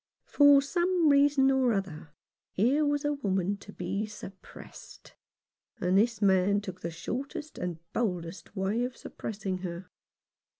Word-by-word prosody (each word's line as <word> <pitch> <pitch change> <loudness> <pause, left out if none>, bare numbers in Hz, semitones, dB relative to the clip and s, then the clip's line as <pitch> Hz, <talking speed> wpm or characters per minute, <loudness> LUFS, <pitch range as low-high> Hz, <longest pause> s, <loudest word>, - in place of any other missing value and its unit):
For 285 -1 +6
some 345 +2 +2
reason 280 -1 +4
or 260 -3 +2
other 180 -6 -4 0.4
here 260 +10 +2
was 290 0 0
a 295 - +1
woman 200 -7 -1
to 200 - -13
be 195 +3 -3
suppressed; 200 -2 -12 0.7
and 180 +1 +1
this 220 +1 +2
man 195 +1 +3
took 185 -3 -8
the 170 - -3
shortest 265 - -6
and 175 -2 -3 0.2
boldest 185 -4 -3
way 200 +5 0
of 250 0 -4
suppressing 195 -3 -5
her. 180 0 -7
205 Hz, 135 wpm, -29 LUFS, 185-275 Hz, 0.7 s, For